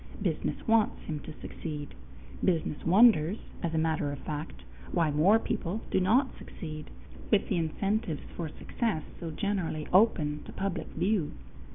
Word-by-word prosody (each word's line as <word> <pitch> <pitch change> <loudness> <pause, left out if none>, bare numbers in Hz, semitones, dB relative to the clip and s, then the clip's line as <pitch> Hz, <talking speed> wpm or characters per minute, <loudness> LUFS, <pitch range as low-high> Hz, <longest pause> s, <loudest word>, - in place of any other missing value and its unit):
Business - - -2
wants 225 -1 +3
him 155 -2 -4
to 155 - -8
succeed. 150 -3 -6 0.5
Business 165 -4 +1
wonders, 195 -2 +6 0.2
as 165 -1 -1
a - - +2
matter 160 -2 +1
of 145 - -4
fact, 150 +3 -6 0.3
why 165 -4 +2
more 170 +9 +5
people 210 -1 -2
do - - +3
not 240 +9 +3
succeed, 155 -3 -7 0.4
with 210 - +3
the 190 - +1
incentives 170 +1 -1
for 165 -3 -3
success 195 0 -2 0.2
so 170 - -4
generally 165 -3 -2
open 155 -7 +4
to - - -9
public 195 -3 -2
view. 190 -5 0
170 Hz, 150 wpm, -30 LUFS, 155-205 Hz, 0.5 s, wonders